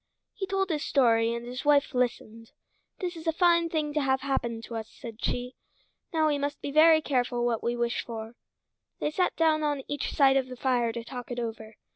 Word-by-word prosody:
He 385 -3 -4
told 390 -1 0
his 300 -2 -1
story 230 -4 +3
and 235 0 -4
his 250 +2 -6
wife 290 0 +3
listened. 230 -2 -2 0.5
"This 360 -2 -3
is 325 0 -9
a - - +4
fine 340 0 +3
thing 305 -2 -1
to 300 - +1
have 265 -1 +1
happen 240 -4 -1
to 230 - -7
us," 220 -1 -5
said 230 -3 -10
she. 250 +1 -2 0.6
"Now 320 -3 +2
we 290 -2 +1
must 285 +1 -3
be 285 - -5
very 315 +1 +6
careful 245 -3 0
what 235 -2 0
we 240 +1 -1
wish 235 0 -1
for." 225 -1 -7 0.7
They 295 - -1
sat 360 +3 0
down 315 -1 +3
one 295 -1 0
on 270 - -8
each 290 -1 -3
side 270 -2 +4
of 265 -1 0
the 255 -1 -9
fire 245 -3 +1
to 235 0 -6
talk 245 0 -8
it 245 - -5
over. 220 -2 -6
265 Hz, 220 wpm, -28 LUFS, 235-310 Hz, 0.7 s, very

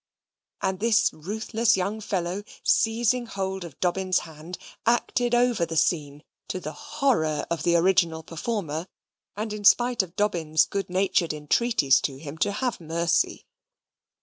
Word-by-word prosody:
And 190 -1 0
this 225 +1 +3
ruthless 220 +6 0
young 200 +4 -2
fellow, 185 0 -2 0.2
seizing 235 +2 +2
hold 190 -2 -3
of 165 -5 -11
Dobbin's 185 +1 +1
hand, 160 +2 -9 0.3
acted 240 +1 +1
over 240 -6 +2
the 165 -1 -2
scene, 150 -3 0 0.2
to 185 - -3
the 155 - -6
horror 270 - 0
of 170 - -1
the 170 0 +2
original 170 -2 +2
performer, 165 -1 -4 0.5
and 215 0 -3
in 210 -1 -6
spite 240 +3 +5
of 185 -2 -9
Dobbin's 165 -7 +2
good 195 -1 -4
natured 180 -3 +1
entreaties 150 - +2
to 135 -2 -3
him 150 +2 -9
to 200 - +2
have 245 -1 -2
mercy. 165 +1 0
185 Hz, 145 wpm, -25 LUFS, 160-220 Hz, 0.5 s, spite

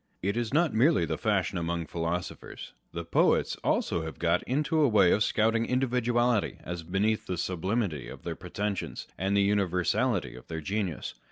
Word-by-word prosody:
It 100 +3 0
is 120 -2 -1
not 160 +3 +2
merely 120 - +4
the 80 0 -2
fashion 95 -1 0
among 85 0 -2
philosophers 85 +2 -4 0.2
â€" - - -44
the 85 0 -4
poets - - +2
also 85 - +1
have 80 0 -6
got 85 +1 +2
into 150 +4 +1
a 145 - +5
way 100 -6 +5
of 105 - +3
scouting 115 +1 +2
individuality 120 -3 +1
as 85 0 -5
beneath 100 +6 0
the 90 - -2
sublimity 90 - -1
of - - -10
their - - -3
pretensions, 100 -2 -4
and 95 +2 0
the 100 0 +4
univer 95 -4 +1
sality 110 - +1
of 65 - -13
their 80 -1 -4
genius. 95 0 -3
100 Hz, 180 wpm, -29 LUFS, 85-115 Hz, 0.2 s, a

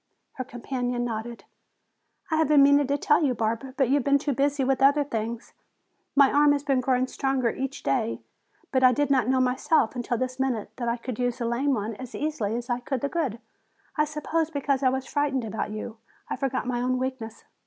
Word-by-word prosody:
Her 260 - -5
companion 245 0 -3
nodded. 230 0 -5 0.9
"I 315 - +2
have 320 -1 +3
been 290 -1 +6
meaning 285 0 +5
to 285 +1 +1
tell 295 +2 +3
you, 260 -4 +1
Barbara, 230 +4 -2
but 270 -4 +2
you - - +3
have 285 -2 +2
been 280 +1 +4
too 285 0 -2
busy 280 +2 +1
with 270 0 +1
other 285 +2 +5
things. 230 -3 -5 0.6
My 280 -1 +6
arm 290 0 +5
has 285 -1 -2
been 275 -3 +1
growing 255 0 +1
stronger 260 -2 0
each 270 +1 -5
day, 230 -4 0 0.5
but 260 -1 +2
I 255 0 +7
didn't 275 -3 +2
know 260 0 +3
myself 255 0 +2
until 240 -1 -2
this 255 +2 -3
minute 245 -6 -1
that 240 -2 -2
I 235 - 0
could 245 -1 -6
use 245 -1 0
the 235 - -3
lame 260 +4 +1
one 215 +1 -3
as 255 -2 -8
easily 265 -9 -2
as 240 0 -3
the 250 +2 -2
good. 300 -10 -1 0.6
I 300 - +2
suppose 305 +1 -2
because 280 -3 -1
I 260 - +4
was 265 0 -2
frightened 280 -4 -1
about 220 -1 -3
you, 215 +1 -6 0.3
I - - 0
forgot 270 -3 -2
my 245 -1 -1
own 255 +1 0
weakness." 255 -4 -5
260 Hz, 205 wpm, -26 LUFS, 240-280 Hz, 0.9 s, I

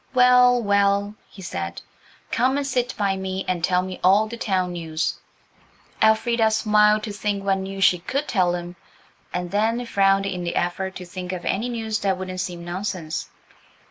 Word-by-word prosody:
"Well, 250 0 +6
well," 200 0 +2 0.2
he 190 - -12
said, 85 - -4 0.5
"come 260 +3 +2
and 285 - -1
sit 250 -2 -1
by 200 -2 +1
me 190 0 -4
and 180 -2 -1
tell 180 0 +2
me 185 0 -6
all 195 +4 +5
the 230 - -6
town 190 -5 -1
news." 165 -2 -3 0.8
Elfrida 220 +1 +3
smiled 215 -1 +3
to 220 - -4
think 200 0 -2
what 195 -1 +1
news 195 0 -3
she 180 -1 +5
could 275 - -3
tell 180 -5 +2
him, 175 0 -7 0.5
and 180 -1 -4
then 225 +4 0
frowned 195 -2 +2
in 185 -2 -3
the 170 - -3
effort 190 +2 -2
to 180 - -7
think 180 0 -6
of 185 -2 -5
any 225 +6 -1
news 220 -2 -2
that 190 -2 0
wouldn't 185 0 -4
seem 175 -2 -5
nonsense. 175 -3 -4
195 Hz, 175 wpm, -23 LUFS, 180-220 Hz, 0.8 s, Well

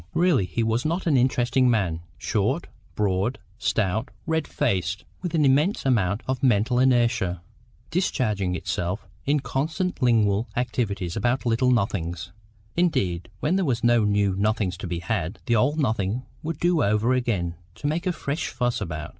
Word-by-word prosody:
Really 170 - +3
he 90 +7 -1
was 115 +2 +1
not 170 +4 -1
an 160 -5 +3
interesting 125 0 +3
man: 95 -8 +1 0.2
short, - - 0 0.3
broad, 100 +4 0 0.2
stout, 110 +3 0 0.2
red 160 -2 0
faced, 100 - -1 0.2
with 175 -2 -3
an 155 -2 +3
immense 145 +9 +2
amount 105 -6 +1
of 130 -1 -1
mental 125 0 +3
inertia, 120 -9 +2 0.5
discharging 105 - 0
itself 90 +3 -3 0.2
in 145 0 +2
constant 160 +7 -2
lingual 110 -3 +3
activity 110 -6 -1
about 120 +4 0
little 120 +2 +2
nothings. 90 -7 -1 0.4
Indeed, 95 - 0
when 175 +5 +2
there 195 - +1
was 125 -6 0
no 120 -1 +4
new 100 -2 +2
nothing 105 -1 +1
to 90 +1 -6
be 85 0 -3
had, 90 0 -2
the 120 - +2
old 145 +8 +2
nothing 115 -4 0 0.2
would 165 -1 -4
do 175 -2 +2
over 105 +5 +2
again 105 -9 0 0.2
to - - -10
make 160 +5 0
a - - +3
fresh 150 -2 -3
fuss 120 -1 -1
about. 80 -2 -4
120 Hz, 160 wpm, -25 LUFS, 100-135 Hz, 0.5 s, no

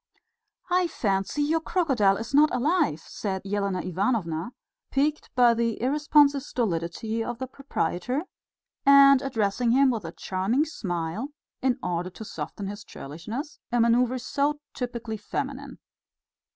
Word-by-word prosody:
"I 360 0 +3
fancy 200 - -1
your 320 +3 +2
crocodile 265 - +2
is 225 +4 -6
not 300 +2 +6
alive," 290 - +1
said 190 +1 -4
Elena 200 -2 -1
Ivanovna, 185 0 -1 0.4
piqued 295 +3 0
by 245 -2 +6
the 230 -1 -1
irresponsive 290 +2 +3
stolidity 220 - -2
of 240 +1 -4
the 260 - -3
proprietor, 260 - -2 0.6
and 275 -1 +7
addressing 230 -2 0
him 270 0 +5
with 225 -5 -3
a 165 - -5
charming 195 - 0
smile 185 - -3 0.3
in 255 -2 +2
order 180 0 -2
to 215 +4 -10
soften 205 - -6
his 205 +1 -6
churlishness 215 - -7
a 240 - +2
manoeuvre 240 +2 +3
so 285 +4 -1
typically 240 -3 -4
feminine. 275 +6 -5
235 Hz, 130 wpm, -26 LUFS, 195-275 Hz, 0.6 s, and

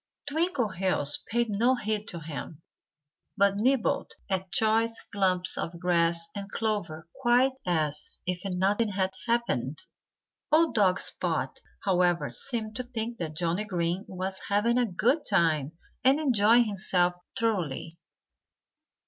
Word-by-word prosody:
Twinkleheels 215 - 0
paid 235 -1 0
no 235 +6 +3
heed 215 -3 -2
to 170 - -4
him, 155 +1 -7 0.7
but 200 0 +3
nibbled 250 +2 +1 0.2
at 190 -1 -2
choice 225 +1 +2
clumps 185 -2 +2
of 170 0 -4
grass 170 -1 +2
and 200 -1 -6
clover 180 -8 -2
quite 250 +1 +4 0.2
as 155 -4 0
if 180 0 -2
nothing 195 +3 +1
had 190 -1 0 0.2
happened. 230 - 0 0.7
Old 320 +1 +4
dog 195 -3 +3
Spot, - - -2 0.3
however, 175 -7 +2
seemed 220 - -4
to 250 - -2
think 235 -1 -5
that 160 -3 -4
Johnnie 175 +3 0
Green 175 -1 -1
was 190 +1 -4
having 225 +4 +2
a 245 - +2
good 245 - +2
time 160 -6 +2 0.3
and 270 +3 +5
enjoying 240 -4 +4
himself 185 -4 +2 0.3
thoroughly. 170 -7 -2
195 Hz, 125 wpm, -28 LUFS, 175-230 Hz, 0.7 s, and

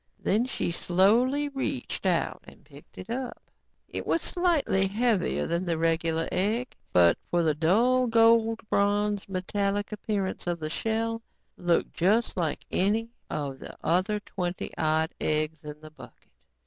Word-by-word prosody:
Then 220 +5 +1
she 260 - -2
slowly 230 +12 +3
reached 270 -6 -3
out 175 -3 0
and - - -16
picked 140 0 -17
it 185 +5 -8
up. 250 0 -4 0.5
It - - -6
was 330 - +1
slightly 315 - +1
heavier 215 -2 +1
than 170 +2 -2
a 165 - +1
regular 165 0 +1
egg, 225 +7 -1 0.2
but 85 -1 +5
for 175 -1 +2
the 155 -2 +3
dull, 230 - +3
gold 225 0 +4
bronze 205 0 +1
metallic 200 +2 -1
appearance 200 -3 -3
of 175 -1 -1
the 155 0 -4
shell, 225 +3 -1 0.3
looked 175 -1 0
just 210 +7 +2
like 165 -5 -2
any 220 +5 +1 0.2
of 140 -3 -4
the - - -10
other 185 +6 +1
twenty 180 -3 -4
odd 160 +1 +1
eggs 155 0 -1
in 150 0 -8
the 155 0 -12
bucket. 130 -6 -15
195 Hz, 150 wpm, -27 LUFS, 165-225 Hz, 0.5 s, but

